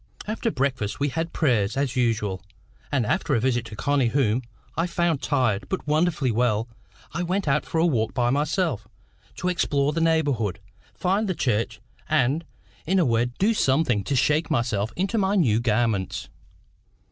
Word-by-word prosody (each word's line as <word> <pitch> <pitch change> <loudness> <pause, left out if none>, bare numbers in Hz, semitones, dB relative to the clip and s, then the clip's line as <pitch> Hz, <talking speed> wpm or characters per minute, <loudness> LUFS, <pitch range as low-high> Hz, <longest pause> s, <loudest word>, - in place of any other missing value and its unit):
After 225 +2 -1
breakfast 130 -6 -1
we 145 +1 +1
had 165 +4 -3
prayers, 120 -7 +1
as 140 -2 0
usual, 110 -6 0 0.5
and 130 -6 +1
after 140 +6 0
a - - +2
visit 120 0 0
to 115 - -8
Connie, 140 +2 +1
whom 125 -2 +1 0.3
I 165 +2 0
found 170 -4 0
tired, 125 -8 0
but 190 - -3
wonderfully 150 -3 +1
well, 115 -1 +1 0.5
I 170 - -2
went 185 +1 -1
out 140 +2 +1
for - - -2
a 160 - +4
walk 115 -10 0
by 120 -1 +2
myself, 145 - 0 0.5
to 180 - -3
explore 145 -5 +1
the 165 - -1
neighbourhood, 145 - +1 0.4
find 195 +3 0
the 185 - 0
church, 110 -4 -1 0.3
and, 155 +1 +2 0.4
in 190 +3 +2
a 180 - +4
word, 120 0 0
do 215 +4 +3
something 130 - +2
to 140 - -1
shake 150 +6 +2
myself 115 -7 0
into 195 +5 0
my 195 +1 +1
new 120 - +3
garments. 110 -4 0
135 Hz, 170 wpm, -25 LUFS, 115-165 Hz, 0.5 s, a